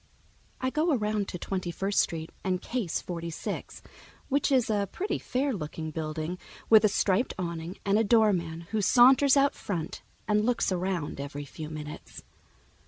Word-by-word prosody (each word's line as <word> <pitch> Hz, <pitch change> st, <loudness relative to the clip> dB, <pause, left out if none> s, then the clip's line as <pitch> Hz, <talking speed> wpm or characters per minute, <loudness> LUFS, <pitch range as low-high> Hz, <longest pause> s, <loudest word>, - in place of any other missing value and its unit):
I 260 Hz, 0 st, -1 dB
go 310 Hz, +3 st, +2 dB
around 210 Hz, -3 st, -1 dB
to -, -, -5 dB
Twenty 185 Hz, 0 st, -3 dB
first 195 Hz, +3 st, 0 dB
Street 160 Hz, -1 st, -1 dB
and 185 Hz, -1 st, 0 dB
case 225 Hz, -5 st, -2 dB
Forty 170 Hz, -1 st, -5 dB
six, 160 Hz, -, -6 dB, 0.5 s
which 280 Hz, +1 st, +1 dB
is 255 Hz, -4 st, +3 dB
a 205 Hz, -3 st, 0 dB
pretty 400 Hz, +3 st, -2 dB
fair 270 Hz, +2 st, -1 dB
looking 160 Hz, -3 st, -5 dB
building 155 Hz, +3 st, -4 dB, 0.3 s
with 220 Hz, -1 st, +8 dB
a 215 Hz, -, +5 dB
striped 200 Hz, +3 st, +1 dB
awning 170 Hz, 0 st, -4 dB
and 200 Hz, +1 st, +3 dB
a -, -, +3 dB
doorman 200 Hz, -7 st, +2 dB
who 220 Hz, -1 st, +1 dB
saunters 260 Hz, +6 st, +6 dB
out 275 Hz, 0 st, +4 dB
front 170 Hz, -6 st, -4 dB, 0.3 s
and 210 Hz, 0 st, +3 dB
looks 245 Hz, -3 st, +1 dB
around 180 Hz, -5 st, -2 dB
every 145 Hz, +1 st, -6 dB
few 155 Hz, +2 st, -8 dB
minutes. 150 Hz, -1 st, -8 dB
195 Hz, 165 wpm, -28 LUFS, 165-225 Hz, 0.5 s, with